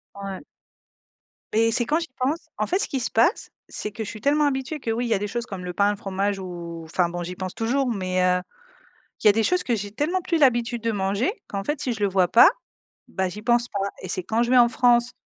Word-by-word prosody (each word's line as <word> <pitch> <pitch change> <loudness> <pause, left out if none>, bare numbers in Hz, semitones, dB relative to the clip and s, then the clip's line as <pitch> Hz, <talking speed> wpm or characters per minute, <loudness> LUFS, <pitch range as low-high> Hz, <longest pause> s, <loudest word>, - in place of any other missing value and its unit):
Ouais. 195 -1 -6 1.1
Mais 225 +1 +3
c'est 240 +1 +2
quand 300 +7 +1
j'y 330 - -5
pense, 280 +6 -2
en - - 0
fait 370 - +1
ce 420 - +1
qui 270 - -2
se - - -2
passe, 235 - +2 0.2
c'est 210 - -4
que 220 +2 -5
je - - -5
suis 215 - -8
tellement 295 +2 +3
habituée 275 +2 -2
que 235 - -5
oui 235 +2 -1
il - - -3
y - - +3
a 200 - +1
des 205 - -2
choses 235 +3 -3
comme 190 -5 -7
le 180 - -4
pain, 200 +3 +3
le 205 - -4
fromage 195 +1 -2
ou 170 -3 -7
enfin 170 +2 0
bon 175 0 -4
j'y 180 +1 -6
pense 185 0 -5
toujours, 250 +3 0
mais 185 -2 -1
heu, 180 0 +2 0.8
il - - +6
y - - +10
a - - +8
des 225 +2 +1
choses 360 +9 +2
que 245 - 0
j'ai 205 -1 -5
tellement 315 - -1
plus 335 -1 0
l'habitude 240 -4 +2
de 230 0 0
manger 200 - 0 0.2
qu'en 200 -1 -4
fait, 295 +6 -2
si 255 - -1
je 220 - -8
le 200 - +2
vois 185 -1 +3
pas, 235 - +8 0.6
bah, 190 0 -1
j'y 205 +4 -7
pense 240 +2 +2
pas 200 -2 -2
et - - -6
c'est 185 +1 -2
quand 220 +6 +1
je 240 - -2
vais 255 - +5
en 240 -1 +6
France, 240 -1 +3
225 Hz, 265 wpm, -24 LUFS, 195-250 Hz, 1.1 s, y